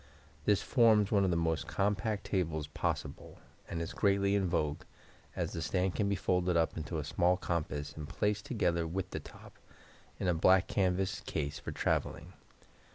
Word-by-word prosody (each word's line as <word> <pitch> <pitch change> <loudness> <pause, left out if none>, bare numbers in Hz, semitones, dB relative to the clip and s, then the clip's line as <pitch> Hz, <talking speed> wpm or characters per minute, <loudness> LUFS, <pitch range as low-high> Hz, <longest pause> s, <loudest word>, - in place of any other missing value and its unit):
This 105 -2 +3
forms 110 -5 +4
one 100 -2 +4
of 95 - +2
the 85 - +1
most 80 -2 0
compact 105 +1 0
tables 80 -6 -1
possible, 75 - -4 0.3
and 85 - -3
is 85 - -4
greatly 100 -1 +2
in 100 -2 +2
vogue, 75 -4 0 0.5
as - - -2
the 80 - -3
stand 90 +3 0
can 100 -1 0
be 100 - +1
folded 90 -1 +1
up 80 -1 +1
into 80 +1 -4
a 75 - -2
small 90 +4 +2
compass, 75 -4 -3
and 75 -1 -7
placed, 105 0 -1
together 85 -8 0
with 95 +3 -3
the - - -3
top, - - -14 0.6
in - - -1
a 90 - +3
black 95 +3 +4
canvas 95 -1 0
case 75 -1 -2
for - - -6
traveling. - - -1
90 Hz, 175 wpm, -32 LUFS, 80-100 Hz, 0.6 s, forms